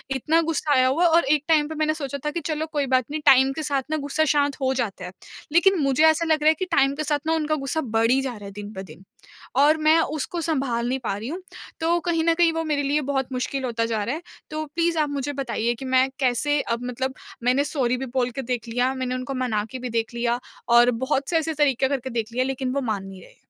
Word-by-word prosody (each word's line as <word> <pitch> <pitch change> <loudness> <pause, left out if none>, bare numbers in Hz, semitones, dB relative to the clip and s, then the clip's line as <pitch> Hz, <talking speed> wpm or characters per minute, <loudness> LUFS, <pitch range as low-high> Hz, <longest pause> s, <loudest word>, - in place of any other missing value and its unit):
इतना 310 +5 +2
गुस्सा 310 -2 0
आया 255 -1 +4
हुआ 295 +7 +2
है 345 - +5
और 330 -1 +4
एक 300 -1 +1
टाइम 305 -2 +3
पे 315 - -6
मैंने 310 0 +1
सोचा 280 -3 -5
था 300 - 0
कि 340 - -3
चलो 310 -1 -1
कोई 290 -1 +1
बात 255 -2 +2
नहीं, 310 - -3
टाइम 265 -1 +6
के 315 - -4
साथ 280 -3 0
ना 310 - +1
गुस्सा 290 +2 0
शांत 285 -1 +1
हो 265 0 +1
जाता 210 -8 -3
है। 180 - -7 0.4
लेकिन 380 +4 +4
मुझे 275 +2 +2
ऐसा 320 +1 +3
लग 315 -2 +1
रहा 310 - +6
है - - +5
कि 370 - -1
टाइम 275 -3 +3
के 305 - -3
साथ 295 -1 0
ना 320 - +2
उनका 310 -1 0
गुस्सा 280 +3 -2
बढ़ 225 -2 +1
ही 265 - +4
जा 265 -2 -3
रहा 205 - -11
है 200 - -8
दिन 205 +1 -8
ब 190 - -6
दिन। 160 +5 -14 0.5
और 295 +3 +5
मैं 315 - +6 0.2
उसको 335 +4 -3
सँभाल 265 -7 -1
नहीं 265 +1 -1
पा 195 - -1
रही 225 +4 -6
हूँ, 350 +5 -5 0.4
तो 335 +2 +2
कहीं 335 -2 0
न 335 - +4
कहीं 335 0 +3
वो 325 0 -1
मेरे 300 -2 -1
लिए 290 +2 +1
बहुत 265 -1 -1
मुश्किल 265 +2 -2
होता 230 -2 -1
जा 225 -2 -1
रहा 245 +7 -2
है। 325 - -6 0.3
तो 310 0 -3
प्लीज़ 335 +3 -1
आप 300 - +1
मुझे 285 0 -3
बताइए 240 -3 -1
कि 265 - -8
मैं 260 0 +3
कैसे 280 +3 +2
अब 235 +1 -3
मतलब 260 +2 -3 0.3
मैंने 255 +3 +3
सॉरी 260 -4 0
भी 265 - -4
बोल 250 0 -1
के 270 - -4
देख 240 -2 -3
लिया, 245 +3 +1
मैंने 255 -1 -2
उनको 255 +2 -4
मना 215 -4 0
के 260 - -6
भी 250 0 -5
देख 230 0 -2
लिया 235 0 0 0.3
और 240 +1 +6
बहुत 270 +1 -1
से 335 - +2
ऐसे 320 0 -1
तरीके 275 -3 +2
करके 265 -2 -2
देख 230 -2 -3
लिया 255 +1 +1
लेकिन 265 -1 -2
वो 280 - 0
मान 215 -5 -2
नहीं 190 -1 -11
रहे। - - -17
270 Hz, 270 wpm, -24 LUFS, 245-310 Hz, 0.5 s, टाइम